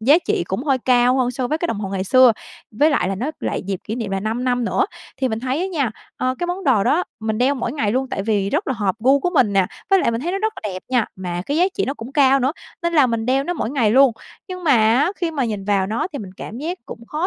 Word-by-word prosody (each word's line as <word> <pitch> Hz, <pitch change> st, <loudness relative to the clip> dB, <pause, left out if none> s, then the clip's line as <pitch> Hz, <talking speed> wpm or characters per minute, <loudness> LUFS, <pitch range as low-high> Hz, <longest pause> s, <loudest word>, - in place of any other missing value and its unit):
giá 280 Hz, +9 st, +5 dB
trị 175 Hz, -, -1 dB
cũng 215 Hz, +9 st, -2 dB
hơi 270 Hz, -3 st, +2 dB
cao 250 Hz, +1 st, +3 dB
hơn 250 Hz, -1 st, +1 dB
so 250 Hz, 0 st, -3 dB
với 310 Hz, -, 0 dB
cái 345 Hz, -, -1 dB
đồng 210 Hz, -9 st, -3 dB
hồ 195 Hz, -, -3 dB
ngày 190 Hz, -1 st, -2 dB
xưa, 255 Hz, +2 st, +6 dB, 0.4 s
với 295 Hz, +9 st, +3 dB
lại 230 Hz, -9 st, +1 dB
là 195 Hz, -, -1 dB
nó 255 Hz, +10 st, -3 dB
lại -, -, -2 dB
dịp 195 Hz, -2 st, -3 dB
kỷ 215 Hz, -, -4 dB
niệm 225 Hz, -5 st, -4 dB
là 195 Hz, 0 st, -1 dB
5 225 Hz, +4 st, -2 dB
năm 245 Hz, -1 st, +1 dB
nữa. 395 Hz, -, +1 dB, 0.3 s
Thì 260 Hz, -, 0 dB
mình 220 Hz, 0 st, -3 dB
thấy 260 Hz, +5 st, -1 dB
á 375 Hz, -, 0 dB
nha, 290 Hz, -, -1 dB, 0.3 s
ờ, 255 Hz, 0 st, 0 dB
cái 350 Hz, -, -1 dB
món 365 Hz, +2 st, -4 dB
đồ 225 Hz, -7 st, +3 dB
đó 350 Hz, +4 st, +2 dB, 0.2 s
mình 220 Hz, 0 st, -2 dB
đeo 265 Hz, +3 st, +3 dB
mỗi 240 Hz, -2 st, -3 dB
ngày 220 Hz, -8 st, 0 dB
luôn 265 Hz, +1 st, 0 dB
tại 195 Hz, -, -3 dB
vì 200 Hz, -2 st, 0 dB
rất 325 Hz, +7 st, 0 dB
là 265 Hz, -, 0 dB
hợp 200 Hz, -4 st, 0 dB
gu 270 Hz, +5 st, +4 dB
của 355 Hz, -, 0 dB
mình 245 Hz, -, +3 dB
nè, 195 Hz, -2 st, +3 dB, 0.2 s
với 390 Hz, -, +6 dB
lại 235 Hz, -, +2 dB
mình 230 Hz, +1 st, -2 dB
thấy 345 Hz, +5 st, -2 dB
nó 390 Hz, -, -1 dB
rất 440 Hz, +1 st, -1 dB
là 210 Hz, -, -2 dB
đẹp 185 Hz, -, -7 dB
nha, 250 Hz, -4 st, +2 dB
mà 175 Hz, -1 st, -4 dB
cái 290 Hz, -, -1 dB
giá 355 Hz, -, +4 dB
trị -, -, 0 dB
nó 275 Hz, -, -3 dB
cũng 245 Hz, +1 st, -9 dB
cao 275 Hz, -2 st, +4 dB
nữa, 265 Hz, +4 st, +1 dB, 0.3 s
nên 340 Hz, 0 st, 0 dB
là 295 Hz, -5 st, +5 dB
mình 230 Hz, -1 st, -2 dB
đeo 270 Hz, +2 st, +2 dB
nó 355 Hz, -, -1 dB
mỗi 275 Hz, -8 st, -3 dB
ngày 240 Hz, -7 st, +2 dB
luôn. 265 Hz, 0 st, +6 dB, 0.4 s
Nhưng 365 Hz, -1 st, -7 dB
mà 295 Hz, -, +4 dB
á, 240 Hz, -, +3 dB
khi 340 Hz, -3 st, -1 dB
mà 280 Hz, -5 st, -1 dB
nhìn 210 Hz, -4 st, -3 dB
vào 195 Hz, -2 st, +1 dB
nó 220 Hz, -, -1 dB
thì 285 Hz, -, -4 dB
mình 195 Hz, -3 st, -7 dB
cảm 230 Hz, -, -7 dB
giác 345 Hz, +5 st, -4 dB
cũng 230 Hz, 0 st, -10 dB
khó 315 Hz, +4 st, -2 dB
255 Hz, 305 wpm, -20 LUFS, 220-290 Hz, 0.4 s, xưa